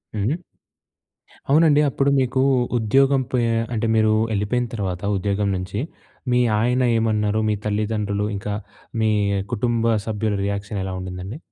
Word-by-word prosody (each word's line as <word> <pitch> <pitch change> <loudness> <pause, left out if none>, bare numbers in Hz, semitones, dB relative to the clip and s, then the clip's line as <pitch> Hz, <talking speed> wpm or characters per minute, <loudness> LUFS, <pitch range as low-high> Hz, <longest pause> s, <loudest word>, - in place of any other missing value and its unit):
హ్మ్. 105 +6 0 1.2
అవునండి 150 0 +5
అప్పుడు 140 +1 +1
మీకు 130 0 +1 0.4
ఉద్యోగం 135 +5 +3
పొయి 120 -2 +1 0.3
అంటే 115 0 0
మీరు 110 -1 +3 0.2
యెళ్ళిపోయిన 110 +4 0
తర్వాత 95 -5 -3 0.2
ఉద్యోగం 100 +1 0
నుంచి 95 +3 -4 0.5
మీ 125 - +4 0.2
ఆయన 125 +3 +1 0.2
ఏమన్నారు? 110 -1 +1
మీ 105 - +1
తల్లిదండ్రులు 105 -1 -1
ఇంకా 100 +1 -4 0.5
మీ 110 -1 +3 0.4
కుటుంబ 115 0 +1
సభ్యుల 105 -1 -1
రియాక్షన్ 100 0 -3
ఎలా 95 - -4
ఉండిందండి? 90 +6 -6
110 Hz, 125 wpm, -22 LUFS, 100-120 Hz, 1.2 s, అవునండి